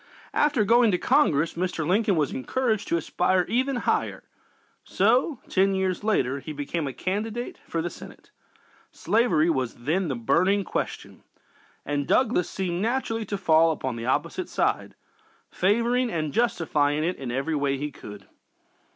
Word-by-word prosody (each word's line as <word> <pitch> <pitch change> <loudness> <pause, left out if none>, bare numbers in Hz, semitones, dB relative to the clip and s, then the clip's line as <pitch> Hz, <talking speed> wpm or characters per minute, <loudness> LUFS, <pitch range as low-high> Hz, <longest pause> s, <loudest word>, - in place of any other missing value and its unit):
After 290 -7 +2
going 235 +1 +5
to 180 - +2
Congress, 170 - +2
Mr. 175 -2 -2
Lincoln 200 +4 +2
was 150 -4 0
encouraged 220 - -1
to 170 - +1
aspire 180 +2 +1
even 255 +5 0
higher, 245 - -1 0.6
so, 260 +1 +2
ten 195 0 +2
years 190 0 -1
later, 140 - +1
he 155 +3 -7
became 145 +2 -3
a - - -3
candidate 215 - -4
for 165 -1 -2
the 175 - -2
Senate. - - -13 0.6
Slavery 180 -5 +2
was 130 -6 -2
then 175 +5 +1
the 135 - -2
burning 185 - +2
question, - - -5 0.6
and 145 -1 -2
Douglas 230 -8 +2
seemed 180 -2 -3
naturally 225 -1 -1
to 200 0 -3
fall 165 -3 +4
upon 130 -5 -2
the 115 +1 -5
opposite 130 - -1
side, - - -1 0.6
favoring 235 +6 +1
and 155 -3 -2
justifying 155 -10 +1
it 180 +3 -1
in 135 -3 -6
every 135 +6 -2
way 140 -1 0
he 145 +2 -4
could. 105 -6 -11
180 Hz, 150 wpm, -25 LUFS, 150-220 Hz, 0.6 s, going